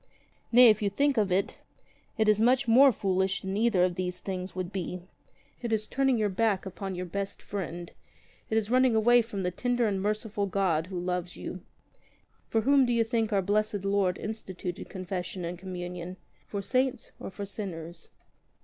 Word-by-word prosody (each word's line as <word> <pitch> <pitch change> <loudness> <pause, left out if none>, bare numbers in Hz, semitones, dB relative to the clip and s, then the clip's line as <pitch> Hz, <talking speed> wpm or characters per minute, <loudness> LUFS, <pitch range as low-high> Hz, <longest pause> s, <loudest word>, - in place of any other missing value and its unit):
Nay, 245 0 +9
if 215 -1 +3
you 205 - +1
think 280 +7 +1
of 210 -5 +1
it, 190 +2 0 0.6
it 220 -1 +2
is 215 0 +4
much 250 +4 +3
more 260 +4 +7
foolish 190 -3 0
than 190 0 -3
either 215 -4 +3
of 180 -1 +2
these 180 0 -3
things 185 -1 -5
would 185 -1 -4
be. 180 -2 -4 0.6
It 235 -2 -3
is 215 -1 +1
turning 270 +2 +1
your 215 - +1
back 200 0 0
upon 190 0 -5
your 180 +1 -4
best 200 +3 -4
friend; 175 -3 -5 0.6
it 220 - +1
is 220 0 -1
running 255 -2 +4
away 240 +2 +5
from 210 -4 -5
the 180 - 0
tender 245 +5 0
and 195 -3 0
merciful 210 0 -1
God 180 -4 +1
who 185 -2 -4
loves 180 0 -3
you. 185 - -7 0.9
For 225 - +2
whom 275 +3 +5
do 240 - +1
you 230 -1 +3
think 225 -1 -1
our 195 -2 +2
Blessed 205 0 0
Lord 195 -2 +1
instituted 190 -4 -6
Confession 185 -1 -5
and 175 +1 -5
Communion 180 -1 -6 0.2
— - - -37
for 200 -1 -4
saints 255 +5 0
or - - -6
for 200 +1 -6
sinners? 175 -5 -7
200 Hz, 185 wpm, -28 LUFS, 180-225 Hz, 0.9 s, Nay